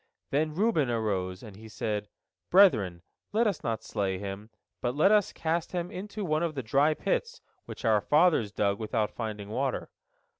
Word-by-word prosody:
Then 150 +2 0
Reuben 180 - +2
arose, 100 -5 -2
and 105 -4 -10
he 110 +2 -12
said, 105 -2 -3 0.4
"Brethren, 110 - +4 0.3
let 225 +3 +3
us 200 -6 -1
not 115 -2 -2
slay 95 -2 -2
him, 100 +2 -6 0.3
but 125 +1 -1
let 155 +7 +4
us 210 -2 +4
cast 165 +2 -2
him 175 -1 -2
into 205 +2 -5
one 155 -1 +1
of 165 -3 -1
the 135 - -3
dry 140 +7 +3
pits, - - -2 0.3
which - - -8
our 110 -2 +4
fathers 150 - +3
dug 100 -1 0
without 110 -1 -1
finding 105 -3 -5
water." 130 +4 -2
125 Hz, 175 wpm, -29 LUFS, 105-170 Hz, 0.4 s, Brethren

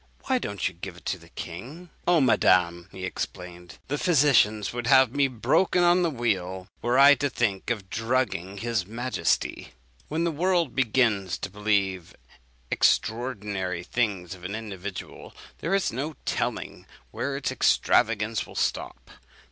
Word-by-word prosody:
Why 260 -1 +1
don't 100 - -2
you - - -5
give 90 +1 -8
it - - -17
to 95 - -2
the 85 0 -17
king?' 130 - -9 0.2
"'Oh, 175 -2 +5
madam,' 90 -8 +3
he 95 0 -6
exclaimed, 90 -1 -6
'the 145 +2 -2
physicians 125 - +3
would 120 -1 -3
have 130 -2 +5
me 140 -1 +3
broken 135 - +2
on 175 +1 +5
the 170 - +2
wheel, 95 - -2
were 120 +2 +1
I 140 +1 +9
to 145 0 0
think 105 -7 -1
of 105 -5 -2
drugging 105 -5 -1
his 115 -2 -1
majesty.'" 120 +4 -2 0.3
When 160 +2 -1
the 170 - +1
world 170 -2 +1
begins 110 -8 +1
to 95 - -6
believe 100 -3 -1 0.6
extraordinary 105 -7 0
things 100 -5 -1
of 90 -2 -13
an 100 +3 -4
individual, 100 -4 -7 0.2
there 170 +6 0
is 195 -11 0
no 145 +5 -3
telling - - -3 0.2
where - - -3
its - - -2
extravagance 110 -1 +2
will - - -13
stop. - - -3
110 Hz, 150 wpm, -26 LUFS, 95-135 Hz, 0.6 s, I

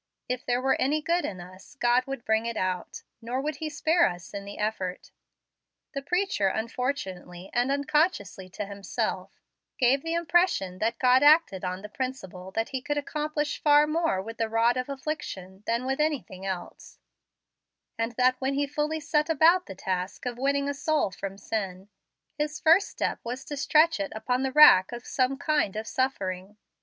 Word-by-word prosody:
If 250 -1 -3
there 245 0 0
were 265 - +2
any 295 +4 +2
good 340 +3 0
in 185 -3 -5
us, 185 +9 -13
God 245 +2 +3
would 270 -3 -6
bring 220 +1 +1
it 235 -1 -3
out, 185 -1 -3 0.2
nor 240 +3 -3
would 295 +1 -3
He 310 +1 -4
spare 320 +3 +3
us 175 +1 -9
in 200 0 -6
the 200 - -8
effort. 195 -4 -3 0.8
The 275 - -3
preacher, 355 - 0
unfortunately 195 -6 -4
and 245 +2 +1
unconsciously 280 - 0
to 200 +2 -5
himself, 200 0 -3 0.5
gave 265 +1 +3
the 330 +2 -2
impression 340 - +1
that 225 +1 0
God 255 0 +4
acted 295 - +5
on 185 +1 -4
the - - -6
principle 210 -7 -6
that 225 +1 -1
He 265 -2 -3
could 290 +2 -2
accomplish 300 0 -2
far 295 0 +6
more 320 - 0
with 225 +2 -9
the 225 -1 0
rod 230 +2 +3
of 255 +1 -3
affliction 265 -10 -5
than 235 +2 0
with 270 +2 -1
anything 270 -11 -2
else, 185 -2 -6 1.0
and 230 +1 -2
that 255 +2 +2
when 270 +1 0
He 285 +1 +1
fully 300 +2 -2
set 300 +1 0
about 330 +4 +4
the 195 - -8
task 185 +2 -3
of 245 -1 -4
winning 280 +1 +1
a 285 - -1
soul 300 -5 0
from 195 0 -6
sin, 195 -2 -4 0.5
His 300 0 -2
first 335 +5 +5
step - - -2
was 250 +3 -5
to 290 - -5
stretch 305 +1 +3
it 195 - -3
upon 250 +4 -1
the 265 0 -1
rack 250 -11 +8
of 240 0 -7
some 260 +1 0
kind 305 - 0
of 215 +1 -3
suffering. 200 -6 -2
255 Hz, 180 wpm, -27 LUFS, 200-295 Hz, 1.0 s, rack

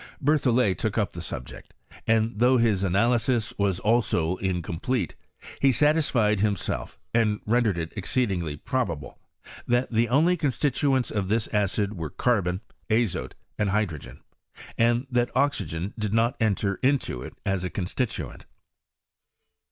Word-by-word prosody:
Berthollet 125 - +2
took 110 -1 -1
up 105 -3 +1
the 85 - -6
subject, 65 -5 -8 0.3
and 110 0 +2
though 125 +2 +5
his 110 -5 +2
analysis 115 +4 +1
was 100 -3 +1
also 95 -6 +1
in 90 -2 -1
complete, 105 +10 -2 0.5
he 140 - +4
satished 130 -7 +2
himself, 100 -2 -2 0.2
and 110 -3 +2
rendered 110 -4 +2
it 80 -1 -4
ex 100 - -4
ceedingly 90 - 0
probable, 85 - -2 0.5
that 120 +1 +1
the 115 +1 +2
only 160 +8 +4
constituents 135 -2 +1
of 100 -3 -1
this 110 +2 +1
acid 105 0 0
were, 80 -6 -5
carbon, 95 - 0 0.3
azote, 110 -3 0 0.2
and 105 -1 +1
hydrogen, 95 -8 -2 0.5
and 120 +2 +2
that 120 -1 +2
oxygen 95 - 0
did 105 0 -1
not 115 +4 +2
enter 100 -2 0
into 130 - +1
it - - -8
as 95 -2 0
a 90 - -2
constituent. 100 +7 -4
110 Hz, 135 wpm, -26 LUFS, 95-125 Hz, 0.5 s, though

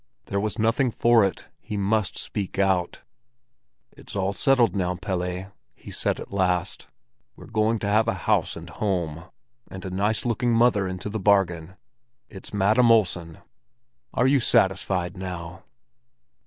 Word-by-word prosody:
There 100 - -2
was 105 +2 -2
nothing 115 +4 +2
for 115 -1 +4
it; 95 - -2
he 105 - -6
must 100 -1 0
speak 100 -3 -4
out. 95 -3 0 0.9
"It's - - -12
all 100 0 0
settled 125 -2 +3
now, 90 -2 0
Pelle," 90 0 -4 0.2
he - - -12
said - - -1
at - - -9
last. 90 -1 0 0.5
"We're - - -13
going 110 +1 +1
to 105 - -4
have 110 +2 +3
a 115 - +1
house - - +1
and - - -9
home, 85 -6 -2 0.4
and 95 0 -8
a 95 - -5
nice 105 +5 0
looking 120 0 +1
mother 115 -4 +3
into 95 +1 -5
the 110 +1 -3
bargain. 95 -4 +1 0.5
It's - - -10
Madam 110 +5 +3
Olsen. 90 -7 +1 0.7
Are 125 - +2
you 135 +1 +4
satisfied 95 -5 +1
now?" 90 -1 -7
100 Hz, 150 wpm, -25 LUFS, 90-110 Hz, 0.9 s, for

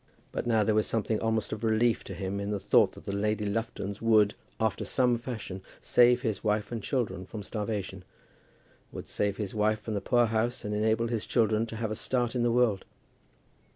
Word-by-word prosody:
But - - -3
now 110 -2 +3
there 110 - +2
was 110 0 +2
something 110 -1 0
almost 110 -1 -1
of 110 +1 -6
relief 115 +1 +2
to 95 - -7
him 95 +3 -3
in 100 0 -3
the 105 -1 -1
thought - - +4
that - - -13
the - - -3
Lady 105 +1 0
Luftons 100 -1 -3
would, 110 -2 +4 0.3
after 110 0 0
some 125 -2 +2
fashion, 110 -6 -6 0.2
save 125 0 +4
his 110 -5 -2
wife 105 0 0
and 115 -2 -3
children 100 -7 -2
from 105 +2 -7
starvation; 105 -3 -4 0.9
would - - -8
save 100 -1 -1
his 105 -3 -4
wife 110 0 +1
from 110 - -5
the 100 - -1
poorhouse, 120 -1 +1
and 105 - -2
enable 110 +2 +1
his 115 -3 -2
children 110 -1 +2
to 115 - -7
have 110 -1 -3
a - - -2
start 120 +1 -1
in 125 - 0
the 120 0 +2
world. 115 -5 +2
110 Hz, 200 wpm, -29 LUFS, 105-115 Hz, 0.9 s, thought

